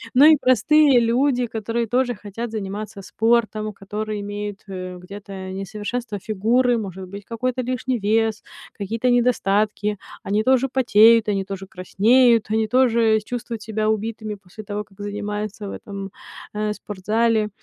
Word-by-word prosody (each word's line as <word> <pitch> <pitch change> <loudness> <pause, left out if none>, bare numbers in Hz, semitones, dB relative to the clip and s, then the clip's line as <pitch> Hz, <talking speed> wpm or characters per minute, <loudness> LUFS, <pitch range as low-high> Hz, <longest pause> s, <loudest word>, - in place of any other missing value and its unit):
но 275 +3 +8
и 310 0 +9
простые 265 +2 +5
люди, 245 +2 +2
которые 230 +1 -2
тоже 245 +1 +1
хотят 210 +3 -6
заниматься 210 0 -5
спортом, 220 0 +1
которые 210 +2 -5
имеют, 205 0 -5
э, 185 -1 -6
где-то 190 0 -8
несовершенство 205 +4 -4
фигуры, 230 +5 +1
может 190 -3 -6
быть, 200 +2 -9
какой-то 255 +2 -2
лишний 250 0 -2
вес, 220 +1 +1 0.3
какие-то 225 +5 -2
недостатки. 210 -4 +1 0.3
Они 205 +2 0
тоже 260 +2 +3
потеют, 230 -3 +5
они 200 -2 0
тоже 195 -1 -7
краснеют, 225 +5 +3
они 220 0 +1
тоже 230 -2 +3
чувствуют 235 -2 -5
себя 215 0 -1
убитыми 220 0 -2
после 200 +2 -12
того, 205 0 -4
как 195 -1 -25
занимаются 210 0 -4
в - - -5
этом, 195 -1 -7 0.4
э, 210 0 -1
спортзале. 215 +2 0
215 Hz, 140 wpm, -22 LUFS, 205-235 Hz, 0.4 s, и